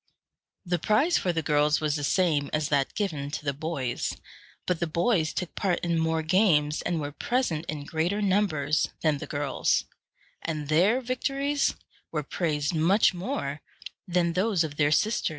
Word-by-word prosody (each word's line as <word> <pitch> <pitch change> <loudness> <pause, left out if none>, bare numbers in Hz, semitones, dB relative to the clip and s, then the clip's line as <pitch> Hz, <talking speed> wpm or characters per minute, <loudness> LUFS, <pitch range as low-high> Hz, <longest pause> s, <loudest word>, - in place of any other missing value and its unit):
The 175 -1 0
prize 240 - +3
for 180 - 0
the 165 -1 -2
girls 150 +1 +2
was 150 -2 0
the 145 - -3
same 150 -3 +1
as 150 -1 0
that 140 -2 +1
given 155 -9 -2
to 150 - -5
the 140 - 0
boys; 140 -4 -3 0.5
but 180 -3 0
the 170 - 0
boys 170 0 +1
took 180 - -4
part 185 -3 0
in 170 -1 0
more 160 0 0
games, 160 -4 +3
and 170 -2 -1
were 145 -1 -4
present 170 - -1
in 150 -2 -5
greater 165 +7 -1
numbers, 185 -8 +1
than 155 -3 +1
the - - -7
girls, 145 -2 0 0.6
and 155 -3 -4
their 190 +11 +3
victories 275 +3 0 0.4
were 150 -2 -2
praised 150 0 -1
much 180 +7 +4
more 175 - -4 0.5
than 175 -1 +1
those 190 -1 +2
of 150 -2 -6
their 145 -1 +3
sisters. 215 +8 +2
160 Hz, 170 wpm, -27 LUFS, 150-190 Hz, 0.6 s, much